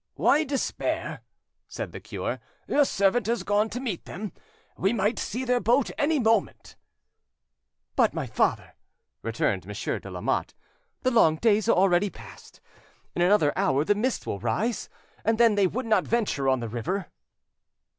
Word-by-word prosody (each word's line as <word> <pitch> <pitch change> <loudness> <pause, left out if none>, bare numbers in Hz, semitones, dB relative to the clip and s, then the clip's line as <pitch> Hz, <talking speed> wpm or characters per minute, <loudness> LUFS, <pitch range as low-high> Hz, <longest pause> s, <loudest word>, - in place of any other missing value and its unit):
"Why 300 +2 +3
despair?" 275 -2 -2 0.5
said - - -6
the - - -7
cure. - - -4 0.3
"Your 290 - +4
servant 200 0 +1
has 230 -4 0
gone 210 +2 +1
to 245 - -4
meet 230 -10 -4
them; 200 +4 -6 0.4
we 195 +4 +1
might 215 +1 0
see 250 +5 -3
their 250 0 +2
boat 245 +3 +2
any 300 +2 +1
moment." 225 -3 0 1.2
"But, - - +4
my - - -3
father," - - 0 0.5
returned - - -1
Monsieur - - -3
de - - -10
Lamotte, - - -2 0.5
"the 255 - +2
long 195 -10 +5
days 215 +4 +2
are - - +5
already 190 +1 +3
past. - - -14 0.5
In 175 - -2
another 175 -5 +4
hour 140 +2 +2
the 205 - +4
mist 235 +5 -1
will 100 - -3
rise, 200 - -1 0.3
and 225 +1 +2
then 230 -2 +5
they 200 -2 +3
would 250 +8 -3
not 220 -1 +2
venture 205 - +1
on 130 -2 +2
the 115 - -3
river." 125 - -3
210 Hz, 160 wpm, -26 LUFS, 185-240 Hz, 1.2 s, long